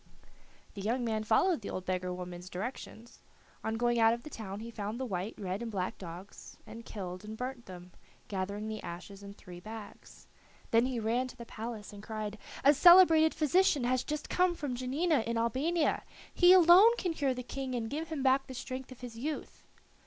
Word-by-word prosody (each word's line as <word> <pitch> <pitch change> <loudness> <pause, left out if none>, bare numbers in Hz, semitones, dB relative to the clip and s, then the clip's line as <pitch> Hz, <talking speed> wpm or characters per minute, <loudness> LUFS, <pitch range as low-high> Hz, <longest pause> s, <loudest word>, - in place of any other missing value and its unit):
The 200 - -7
young 240 +5 -1
man 220 -1 -1
followed 280 - +2
the 200 - -6
old 185 - -5
beggar 185 0 -2
woman's 180 0 -7
directions. 230 +3 -7 0.4
On 220 - -1
going 240 0 +1
out 225 0 +5
of 235 - -12
the 305 - -10
town 200 -4 -6
he 230 +1 -7
found 215 +1 -5
the 260 - -2
white, 195 -1 -4
red, 190 +1 -4
and 235 - -4
black 185 -3 -3
dogs, 180 +2 -10
and 225 +1 -10
killed 185 -4 -7
and 215 +1 -8
burnt 250 0 -5
them, 180 -1 -10 0.4
gathering 200 +2 -3
the 220 -1 -5
ashes 185 +3 -8
in 200 0 -10
three 180 -3 -11
bags. 215 +2 -11 0.5
Then 230 +2 +4
he 255 -3 -2
ran 235 +4 0
to 255 - -12
the 235 - -8
palace 225 -2 -7
and 205 - -10
cried: 215 -1 -5 0.2
"A 285 - +7
celebrated 325 0 +7
physician 310 -2 +3
has 255 +1 +1
just 300 0 -4
come 360 -1 +2
from 285 -5 -4
Janina 275 +6 +1
in 230 0 -1
Albania. 280 +9 +1 0.3
He 355 0 +6
alone 375 +6 +8
can 355 -6 -1
cure 275 -4 0
the 250 - -5
King 265 0 -4
and 230 -2 -2
give 310 +7 -4
him 310 -4 -4
back 270 0 +3
the 260 - -8
strength 260 +1 -6
of 255 - -12
his 235 -2 -8
youth." 300 +4 -5
235 Hz, 200 wpm, -31 LUFS, 205-270 Hz, 0.5 s, alone